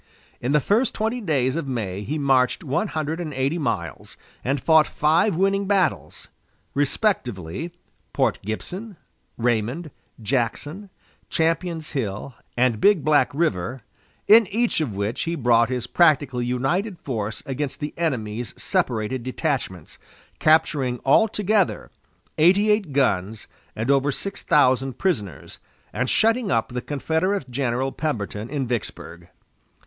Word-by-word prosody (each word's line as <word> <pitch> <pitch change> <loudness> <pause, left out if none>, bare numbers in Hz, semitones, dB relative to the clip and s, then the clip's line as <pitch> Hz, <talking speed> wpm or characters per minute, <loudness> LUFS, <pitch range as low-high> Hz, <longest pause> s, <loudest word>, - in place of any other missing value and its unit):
In 125 - -1
the 150 - +4
first 215 - +1
twenty 225 +3 -1
days 135 - +1
of 165 -4 -3
May 105 -7 -3
he 150 +9 -3
marched 135 +1 +2
one 165 +8 0
hundred 155 -1 -3
and 165 -3 -4
eighty 135 +6 0
miles, 85 - -4 0.3
and 135 +3 0
fought 160 +2 +5
five 165 +6 +2
winning 195 +2 +1
battles 190 -4 0 0.5
respectively 140 - -1 0.4
Port - - +1
Gibson, 180 - -6 0.4
Raymond, 120 +7 -1 0.3
Jackson, 140 - -2 0.4
Champion's 165 0 -1
Hill, 120 -2 -3 0.2
and 120 -3 +2
Big 200 -7 +4
Black 150 -1 +4
River 130 - -1 0.4
in 220 0 +7
each 225 -2 0
of 120 -10 -3
which 100 +5 -2
he 170 +1 -1
brought 115 -4 +3
his 125 -2 -2
practically 140 -5 +2
united 170 - -1
force 110 -7 -4
against 135 0 -4
the 150 0 -4
enemy's 120 -8 -2
separated 125 - -1
detachments, 125 - -3 0.4
capturing 150 -5 +2
altogether 210 +4 +2 0.5
eighty 195 +6 +5
eight 210 -7 +1
guns 110 -6 0 0.3
and 115 +5 0
over 140 +1 +3
six 195 +8 -5
thousand 130 -2 +2
prisoners, 120 - -2 0.3
and 125 +5 -1
shutting 225 0 +2
up 115 -2 +1
the 125 0 -4
Confederate 160 +3 -1
General 130 0 -1
Pemberton 110 -8 -3
in 140 -2 -2
Vicksburg. 95 -7 -5
140 Hz, 130 wpm, -23 LUFS, 120-170 Hz, 0.5 s, in